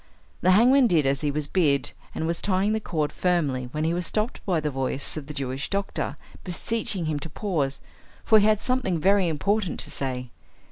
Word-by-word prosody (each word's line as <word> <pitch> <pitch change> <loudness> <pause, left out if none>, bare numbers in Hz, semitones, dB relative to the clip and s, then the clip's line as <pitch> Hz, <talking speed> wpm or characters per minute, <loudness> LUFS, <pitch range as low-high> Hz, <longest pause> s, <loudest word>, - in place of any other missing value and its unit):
The 180 - +3
hangman 245 +7 +6
did 165 -8 +3
as 135 0 +1
he 150 - 0
was 150 +1 -1
bid, 145 -3 +1 0.2
and 160 - -2
was 170 +1 -1
tying 200 +2 +1
the 220 - 0
cord 155 -8 -2
firmly, 145 -9 0
when 150 +2 -2
he 165 +1 +1
was 175 0 -2
stopped 215 +3 -2
by 175 -4 +2
the 150 -1 -2
voice 135 +1 -2
of 150 -3 -6
the 150 - -6
Jewish 135 -1 -3
doctor 200 0 -2 0.3
beseeching 190 0 -1
him 155 -2 -1
to 160 - -7
pause, 150 -6 -2 0.4
for 220 - +6
he 205 - +3
had 215 -1 +3
something 250 -9 0
very 195 +2 +3
important 190 +5 0
to - - -4
say. 125 -2 -4
170 Hz, 200 wpm, -25 LUFS, 145-200 Hz, 0.4 s, hangman